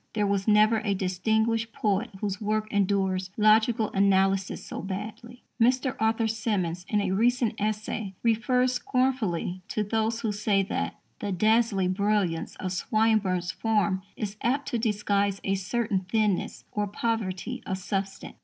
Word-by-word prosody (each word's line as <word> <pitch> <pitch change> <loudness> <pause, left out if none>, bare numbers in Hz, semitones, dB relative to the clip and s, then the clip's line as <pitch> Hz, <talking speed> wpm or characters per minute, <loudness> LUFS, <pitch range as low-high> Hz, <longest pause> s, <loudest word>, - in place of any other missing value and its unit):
There 210 -1 +1
was 200 0 0
never 215 +1 +5
a 205 -2 -1
distinguished 220 +5 0
poet 210 +3 0
whose 200 -1 -2
work 215 0 0
endures 190 -2 +1
logical 220 +1 +4
analysis 195 -1 +2
so - - -6
badly. 215 +5 -7 0.2
Mr. 255 +2 +3
Arthur 225 +1 +2
Symons, 190 -6 -2
in 210 -1 +2
a 195 -2 -1
recent 235 +3 +2
essay, 215 -1 -2
refers 250 +2 +2
scornfully 245 -9 -1
to 215 - -1
those 220 +2 -1
who 220 - 0
say 205 -1 +1
that 195 - -3 0.2
"the 205 -3 -3
dazzling 210 -1 +2
brilliance 200 -5 0
of 185 - -4
Swinburne's 195 -3 +1
form 210 -4 0
is 210 -1 -5
apt 270 +4 0
to 240 - -1
disguise 205 -3 0
a 195 - 0
certain 200 +2 -1
thinness 205 +1 -1
or 210 -1 -1
poverty 205 -3 -2
of 190 - -1
substance." 195 0 -4
210 Hz, 145 wpm, -27 LUFS, 195-225 Hz, 0.2 s, never